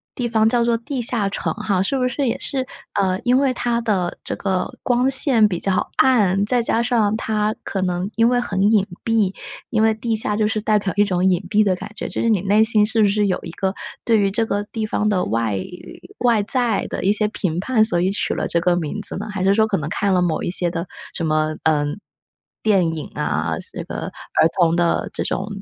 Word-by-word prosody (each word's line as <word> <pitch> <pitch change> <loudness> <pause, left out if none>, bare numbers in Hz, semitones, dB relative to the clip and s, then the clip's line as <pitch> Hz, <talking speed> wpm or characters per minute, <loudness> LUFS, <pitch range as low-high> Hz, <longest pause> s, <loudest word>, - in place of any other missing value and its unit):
地 245 -2 -2
方 220 -1 +2
叫 240 0 +2
做 235 -1 +2
地 250 +2 -4
下 230 -4 +1
城 - - -2
哈， 205 -4 0
是 270 +8 0
不 250 -1 +1
是 265 +1 -1
也 - - 0
是， 260 -2 -2 0.3
呃， 190 -1 0
因 250 +1 +3
为 270 -2 +2
它 240 -1 -1
的 190 -6 -1
这 - - -4
个 190 -2 -2
光 250 +1 +2
线 255 -5 +6
比 175 -4 -3
较 195 -1 0
暗， 205 -6 +3
再 245 +2 +1
加 230 0 0
上 225 -4 +1
它 215 -1 -1
可 195 - -3
能 180 +1 -1
因 230 +1 +4
为 245 0 +2
很 195 -5 -2
隐 200 -3 +3 0.2
蔽， 220 -4 +1 0.4
因 220 -2 +1
为 220 0 +4
地 225 +1 -2
下 210 -1 0
就 215 -1 +2
是 215 -1 -1
代 215 -1 +2
表 195 -1 -3
一 205 - +4
种 185 -2 0
隐 185 -1 +2
蔽 215 0 +3
的 190 -3 +1
感 205 - -9
觉， - - -5
就 - - -4
是 230 - +1
你 205 -5 +2
内 205 +3 +3
心 215 -2 +3
是 220 +1 +1
不 205 - +5
是 205 0 +1
有 185 - 0
一 170 - -7
个 190 +2 -2 0.3
对 225 -2 +4
于 200 -1 +2
这 225 +3 0
个 205 -1 -1
地 220 +1 -4
方 210 0 -1
的 185 -3 +1
外 110 -2 -1 0.6
外 235 -4 +3
在 235 -2 +1
的 - - -5
一 195 - +3
些 210 0 +1
评 175 -5 -2
判， 220 +1 +2
所 220 -6 0
以 185 +2 +1
取 205 - -1
了 - - -2
这 170 - 0
个 180 0 +2
名 175 +6 -3
字 - - -2
呢？ - - -5
还 190 -2 -3
是 195 +1 +4
说 220 +1 +3
可 195 - 0
能 155 0 -4
看 200 +1 0
了 180 - +3
某 165 -3 0
一 - - -2
些 175 -2 0
的 170 +1 -4 0.3
什 165 - -3
么， 155 0 0
呃， 150 -2 +2 0.8
电 185 -6 +2
影 155 - -5
啊， 80 +2 -1
是 - - -8
个 - - -5
儿 - - -1
童 170 -1 +4
的 175 -1 +1
这 - - -2
种 195 +2 -2
205 Hz, 260 characters per minute, -20 LUFS, 185-225 Hz, 0.8 s, 线